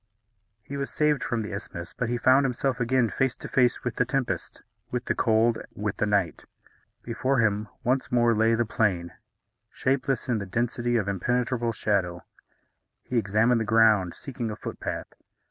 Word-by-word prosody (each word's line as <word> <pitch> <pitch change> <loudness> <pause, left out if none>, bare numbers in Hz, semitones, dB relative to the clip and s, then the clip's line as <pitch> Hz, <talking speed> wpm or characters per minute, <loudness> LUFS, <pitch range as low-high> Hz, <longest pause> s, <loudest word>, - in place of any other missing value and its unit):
He 140 - -6
was 140 -1 -3
saved 150 -4 +1
from 120 -3 -1
the 105 - -6
isthmus; 85 -4 -7
but 125 - -2
he 120 - 0
found 130 +3 +5
himself 135 0 -1
again 125 0 +2
face 130 +5 0
to - - -8
face 125 -2 +2
with 125 - -3
the - - +4
tempest, 125 - -3 0.3
with 125 0 -3
the - - +1
cold, 115 +1 +2 0.2
with 105 -1 -3
the 105 - +1
night. 100 -5 0 0.6
Before 130 +3 0
him 105 -2 +1 0.2
once 130 +2 0
more 120 -1 +4
lay 110 +1 +3
the 120 +1 +1
plain, 95 -6 0 0.6
shapeless 135 0 -1
in 120 -3 +1
the 100 - -5
density 120 +4 -1
of 105 -3 -1
impenetrable 120 +4 0
shadow. 95 -5 -1 0.8
He 125 - 0
examined 115 +3 +2
the - - +1
ground, 110 -5 +4
seeking 120 -4 -5
a 105 - -4
footpath. - - -6
115 Hz, 170 wpm, -26 LUFS, 105-125 Hz, 0.8 s, found